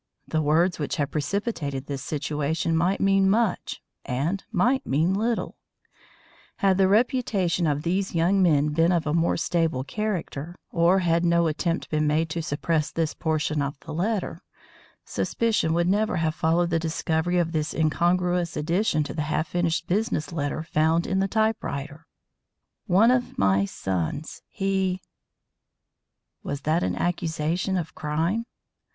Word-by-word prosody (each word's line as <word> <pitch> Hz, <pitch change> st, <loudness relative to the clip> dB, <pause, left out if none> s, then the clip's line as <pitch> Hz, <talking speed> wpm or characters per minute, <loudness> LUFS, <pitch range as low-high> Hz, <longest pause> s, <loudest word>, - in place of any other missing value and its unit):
The 155 Hz, -, 0 dB
words 165 Hz, +4 st, +2 dB
which 145 Hz, -, -2 dB
had 145 Hz, -1 st, -1 dB
precipitated 150 Hz, -, -2 dB
this 140 Hz, -2 st, -5 dB
situation 155 Hz, +2 st, -1 dB
might 175 Hz, +4 st, +1 dB
mean 195 Hz, 0 st, +3 dB
much 215 Hz, -2 st, 0 dB, 0.2 s
and 145 Hz, +10 st, -2 dB
might 245 Hz, +6 st, +2 dB
mean 160 Hz, +7 st, +1 dB
little. 225 Hz, +4 st, -1 dB, 1.0 s
Had 195 Hz, -1 st, +2 dB
the 190 Hz, -, +5 dB
reputation 200 Hz, -, +1 dB
of 145 Hz, 0 st, 0 dB
these 190 Hz, +2 st, -1 dB
young 180 Hz, +4 st, +3 dB
men 150 Hz, -4 st, +3 dB
been 165 Hz, +3 st, +2 dB
of 170 Hz, -3 st, +1 dB
a 150 Hz, -, 0 dB
more 165 Hz, 0 st, +2 dB
stable 165 Hz, -6 st, 0 dB
character, 175 Hz, -3 st, -4 dB, 0.2 s
or 170 Hz, +2 st, +4 dB
had 170 Hz, -1 st, +2 dB
no 170 Hz, 0 st, +3 dB
attempt 165 Hz, +2 st, -1 dB
been 155 Hz, -1 st, +1 dB
made 160 Hz, +2 st, +1 dB
to 165 Hz, -, -2 dB
suppress 155 Hz, 0 st, -1 dB
this 160 Hz, -2 st, -1 dB
portion 155 Hz, -2 st, -1 dB
of 140 Hz, 0 st, -3 dB
the 160 Hz, -, -8 dB
letter, 200 Hz, +5 st, -2 dB, 0.6 s
suspicion 225 Hz, -8 st, 0 dB
would 170 Hz, 0 st, +2 dB
never 205 Hz, +1 st, +1 dB
have 160 Hz, -2 st, 0 dB
followed 170 Hz, +1 st, +1 dB
the 165 Hz, -, +2 dB
discovery 160 Hz, +1 st, -1 dB
of 170 Hz, -2 st, +1 dB
this 155 Hz, -2 st, -1 dB
incongruous 175 Hz, +2 st, +1 dB
addition 165 Hz, 0 st, +1 dB
to -, -, -6 dB
the 155 Hz, -, -2 dB
half 155 Hz, +1 st, -1 dB
finished 175 Hz, -2 st, 0 dB
business 200 Hz, -4 st, -1 dB
letter 145 Hz, 0 st, -2 dB
found 160 Hz, +1 st, +1 dB
in 190 Hz, -, 0 dB
the 195 Hz, -, +1 dB
typewriter; 165 Hz, -9 st, -2 dB, 0.8 s
"one 205 Hz, +6 st, +5 dB
of 250 Hz, -1 st, 0 dB
my 95 Hz, 0 st, +3 dB
sons 95 Hz, -, -3 dB
he" 190 Hz, -2 st, -1 dB, 1.4 s
was 140 Hz, 0 st, -4 dB
that 155 Hz, +4 st, +1 dB
an -, -, -1 dB
accusation 175 Hz, +2 st, -1 dB
of 165 Hz, -3 st, -4 dB
crime? 165 Hz, +10 st, -1 dB
165 Hz, 150 wpm, -25 LUFS, 155-190 Hz, 1.4 s, the